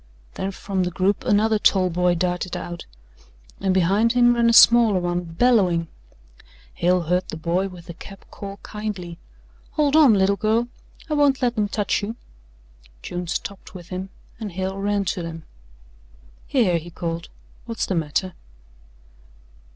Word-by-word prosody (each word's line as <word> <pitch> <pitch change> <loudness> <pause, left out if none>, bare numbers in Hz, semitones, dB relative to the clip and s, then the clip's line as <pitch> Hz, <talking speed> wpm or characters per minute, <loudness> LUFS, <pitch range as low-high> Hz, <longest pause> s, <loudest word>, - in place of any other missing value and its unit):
Then 190 - -3
from 195 0 -3
the 180 - 0
group 190 +3 0
another 215 +1 +3
tall 185 -3 +3
boy 180 +1 +2
darted 180 +1 -2
out 175 0 -7 0.7
and 190 -1 0
behind 195 +6 +2
him 240 -1 +5
ran 235 -1 +3
a - - +4
smaller 230 -4 +7
one, 175 0 -1
bellowing. 175 -2 +2 0.8
Hale 180 +1 +2
heard 180 +3 0
the - - -5
boy 175 +4 0
with 180 -3 -12
the 170 - -8
cap 195 +3 -13
call 200 0 -8
kindly: 200 -5 -6 0.5
"Hold 295 -1 +2
on, 290 -8 +7
little 195 +1 +2
girl! 225 +3 +1 0.4
I 310 - -2
won't 285 -3 +2
let 240 -1 +1
'em 210 -1 +1
touch 205 0 -1
you." 215 +3 -4 0.9
June 175 0 -5
stopped 195 +3 -5
with 175 -2 -10
him 185 +1 -5 0.3
and 210 -5 -6
Hale 190 +2 -3
ran 200 0 0
to 180 0 -2
them. 165 -1 -7 1.0
"Here," 195 -11 +2
he 170 +2 -11
called, 170 -1 -5 0.4
"what's 230 -1 -2
the - - -2
matter?" 165 +2 -1
190 Hz, 155 wpm, -23 LUFS, 175-215 Hz, 1.0 s, smaller